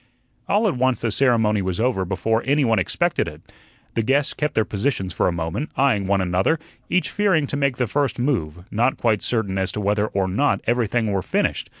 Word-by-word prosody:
All 215 +2 +2
at 190 - 0
once 130 0 +1
the 115 - 0
ceremony 110 -4 +2
was 95 0 -2
over 115 -6 +1
before 110 +5 0
any 145 0 +3
one 115 -3 +2
expected 90 - 0
it. - - -9 0.5
The 115 - 0
guests 140 +5 +1
kept 150 -1 -2
their 110 - +2
positions 100 -3 -2
for - - +1
a - - +2
moment, 85 - -3
eyeing 120 -8 +2
one 100 0 +2
another, 95 - +1 0.3
each 185 - +1
fearing 195 -7 +2
to 140 - -4
make 140 -3 0
the 125 - +1
first 140 +4 -1
move, 90 - -2
not 120 +5 +1
quite 110 -4 +1
certain 100 -5 -1
as 95 0 0
to - - -3
whether 105 +1 +1
or 95 -2 -1
not 110 +11 +1
everything 115 -2 +1
were 95 -1 0
finished. - - -1
115 Hz, 210 wpm, -22 LUFS, 95-135 Hz, 0.5 s, any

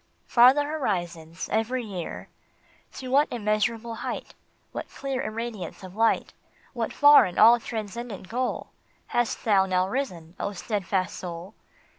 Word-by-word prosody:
" - - -42
Farther 260 +4 +5
horizons 175 - -3
every 235 +3 0
year! 190 -6 -6 0.3
" - - -33
To 255 - -6
what 285 +3 +4
immeasurable 225 +1 -1
height, - - -5 0.4
What - - -6
clear 270 -1 -4
irradiance 220 -4 -5
of 185 0 -10
light, 225 +1 +1 0.4
What 235 -3 -2
far 290 0 +7
and 180 - -6
all 235 +2 +8
transcendent 220 -2 -6
goal 250 +5 -3 0.4
Hast 240 -1 -1
thou 195 -3 +4
now 185 0 +1
risen, 185 -10 -4
O 200 - -2
steadfast 190 -1 -2
soul 175 +2 -7
220 Hz, 140 wpm, -26 LUFS, 185-245 Hz, 0.4 s, all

